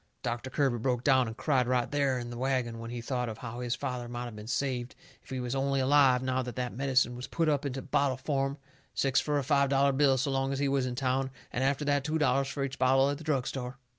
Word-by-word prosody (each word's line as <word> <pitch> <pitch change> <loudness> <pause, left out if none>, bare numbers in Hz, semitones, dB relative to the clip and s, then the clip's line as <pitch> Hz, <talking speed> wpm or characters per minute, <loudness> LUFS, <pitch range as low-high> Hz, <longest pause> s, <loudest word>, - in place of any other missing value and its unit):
Doctor 120 +1 -3
Kirby 130 -3 +1
broke 125 0 0
down 130 -3 +4
and 115 +1 -7
cried 130 -5 +1
right 125 -1 +1
there 140 -3 +1
in 120 -1 -5
the 120 - -6
wagon 125 -3 -1
when 115 0 -6
he 120 0 -5
thought 125 0 -2
of 110 - -6
how 120 0 -7
his 125 -1 -1
father 125 -2 -4
might 120 0 -4
of 115 - -9
been 105 0 -9
saved 125 -1 -2 0.3
if - - -21
he 130 - -3
was 125 0 -3
only 135 0 +1
alive 130 -2 +4
now 130 0 0
that 125 -1 -6
that 125 -1 -3
medicine 130 -2 +1
was 125 +1 -6
put 165 -1 0
up 145 -2 +1
into 135 -1 -4
bottle 140 -1 +1
form, 135 0 -1 0.4
six 135 -1 +2
fur 150 -1 0
a 140 - 0
five 140 0 +3
dollar 140 0 +3
bill 135 -1 +3
so 135 +2 0
long 135 0 0
as 135 - -1
he 140 +1 +1
was 135 -2 +1
in 125 - -4
town, 130 0 0 0.2
and 130 - 0
after 140 +2 +1
that 145 -1 +2
two 155 +1 0
dollars 140 -2 +2
fur 140 0 -3
each 135 0 -4
bottle 135 +2 +4
at 145 - -4
the - - -9
drug 140 -5 0
store. 130 -1 -5
130 Hz, 265 wpm, -30 LUFS, 125-140 Hz, 0.4 s, down